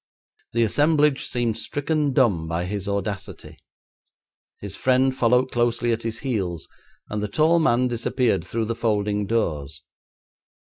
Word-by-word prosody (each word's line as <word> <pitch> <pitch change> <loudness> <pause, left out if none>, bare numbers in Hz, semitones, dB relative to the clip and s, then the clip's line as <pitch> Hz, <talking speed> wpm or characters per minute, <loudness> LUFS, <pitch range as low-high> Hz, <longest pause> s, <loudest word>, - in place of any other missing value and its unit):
The 115 0 +2
assemblage 150 +4 +2
seemed 120 -3 -1
stricken 145 0 -1
dumb 105 -12 +2
by 85 +2 -2
his 100 +1 -4
audacity. 100 -1 -4 1.0
His 100 -1 -6
friend 130 0 +2
followed 125 0 +2
closely 120 0 +1
at 115 0 -1
his 115 0 -4
heels, 95 - -3 0.4
and 105 0 -2
the 105 - -1
tall 160 +10 +3
man 125 -5 +3
disappeared 120 - 0
through 115 +2 -2
the 115 +1 -2
folding 105 -2 0
doors. 75 -9 -2
115 Hz, 135 wpm, -23 LUFS, 100-130 Hz, 1.0 s, tall